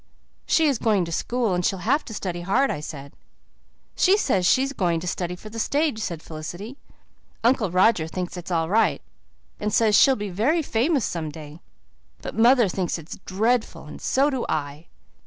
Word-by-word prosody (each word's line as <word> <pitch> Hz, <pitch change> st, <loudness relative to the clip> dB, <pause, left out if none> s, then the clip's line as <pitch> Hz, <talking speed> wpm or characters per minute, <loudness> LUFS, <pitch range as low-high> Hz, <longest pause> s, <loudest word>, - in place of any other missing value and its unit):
"She's 295 Hz, -7 st, +3 dB
going 205 Hz, -6 st, +2 dB
to 170 Hz, -, -7 dB
school 235 Hz, +4 st, -1 dB
and 180 Hz, 0 st, 0 dB
she'll 190 Hz, -, 0 dB
have 285 Hz, +7 st, +2 dB
to 225 Hz, -, -8 dB
study 175 Hz, -4 st, -4 dB
hard," 200 Hz, +10 st, +1 dB
I -, -, -3 dB
said. 140 Hz, -2 st, -8 dB, 0.8 s
"She 380 Hz, +2 st, +4 dB
says 195 Hz, -, +1 dB
she's 270 Hz, +9 st, +2 dB
going 175 Hz, -8 st, 0 dB
to 180 Hz, -, -6 dB
study 180 Hz, 0 st, -3 dB
for 215 Hz, +4 st, -12 dB
the 230 Hz, -, -6 dB
stage," 290 Hz, 0 st, 0 dB
said 170 Hz, -6 st, -4 dB
Felicity. 175 Hz, -, -7 dB, 0.7 s
"Uncle 235 Hz, -4 st, +2 dB
Roger 185 Hz, -2 st, +3 dB
thinks 180 Hz, +2 st, -5 dB
it 175 Hz, -1 st, -7 dB
is -, -, -6 dB
all 165 Hz, -2 st, +1 dB
right, 220 Hz, +5 st, +2 dB, 0.6 s
and 210 Hz, 0 st, -2 dB
says 220 Hz, -1 st, +3 dB
she'll 270 Hz, +4 st, +6 dB
be 205 Hz, -3 st, -5 dB
very 275 Hz, -, +1 dB
famous 265 Hz, +1 st, +1 dB
some 160 Hz, -3 st, -3 dB
day. 150 Hz, +1 st, -11 dB, 0.6 s
But -, -, -5 dB
mother 235 Hz, +1 st, +5 dB
thinks 180 Hz, -1 st, -2 dB
it's 165 Hz, -1 st, -10 dB
dreadful, 220 Hz, +5 st, 0 dB
and -, -, -10 dB
so 280 Hz, +3 st, +2 dB
do 260 Hz, -3 st, -2 dB
I." 145 Hz, +2 st, -3 dB
205 Hz, 185 wpm, -24 LUFS, 175-245 Hz, 0.8 s, she'll